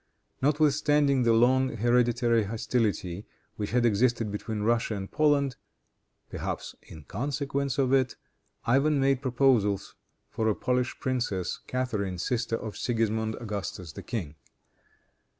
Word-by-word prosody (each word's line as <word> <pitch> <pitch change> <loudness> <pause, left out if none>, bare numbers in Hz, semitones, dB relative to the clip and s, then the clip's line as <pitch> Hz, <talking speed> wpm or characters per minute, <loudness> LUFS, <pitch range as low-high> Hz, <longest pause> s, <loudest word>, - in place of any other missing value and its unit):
Notwithstanding 145 -1 +3
the 115 -1 +4
long 130 +2 +3
hereditary 120 0 +2
hostility 105 -4 -1 0.3
which 105 - -3
had 120 0 +2
existed 115 0 +2
between 105 +1 -4
Russia 115 0 +1
and 95 -1 -6
Poland, 145 -4 +2 0.7
perhaps - - -5
in 80 - -12
consequence 140 - -2
of 135 -1 +2
it, 130 -2 +2 0.5
Ivan 140 +5 +3
made 135 -1 +2
proposals 120 -7 +2 0.4
for 110 - -1
a 110 - +2
Polish 125 0 -1
princess, 120 -9 -2
Catharine, 105 -8 -2
sister 115 +3 -1
of 110 -2 -6
Sigismond 110 -2 0
Augustus, 100 -6 -5
the - - -9
king. 90 -12 -4
120 Hz, 120 wpm, -28 LUFS, 105-135 Hz, 0.7 s, the